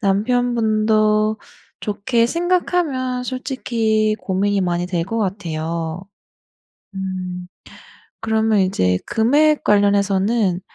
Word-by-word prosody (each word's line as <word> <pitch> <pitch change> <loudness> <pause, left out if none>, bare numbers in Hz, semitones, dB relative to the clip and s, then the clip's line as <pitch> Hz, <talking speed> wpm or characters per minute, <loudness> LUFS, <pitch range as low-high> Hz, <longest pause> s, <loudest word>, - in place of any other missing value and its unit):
남편분도 215 0 +1 0.4
좋게 225 +3 0
생각하면 335 -8 0
솔직히 230 -5 -1
고민이 200 +1 0
많이 175 -1 -1
될 175 -2 -2
것 225 +5 -3
같아요. 170 -3 -3 0.9
음. 185 -2 -5 0.7
그러면 220 -1 +1
이제 90 - +1
금액 290 +7 +2
관련해서는 200 -1 +2
215 Hz, 200 characters per minute, -20 LUFS, 190-235 Hz, 0.9 s, 금액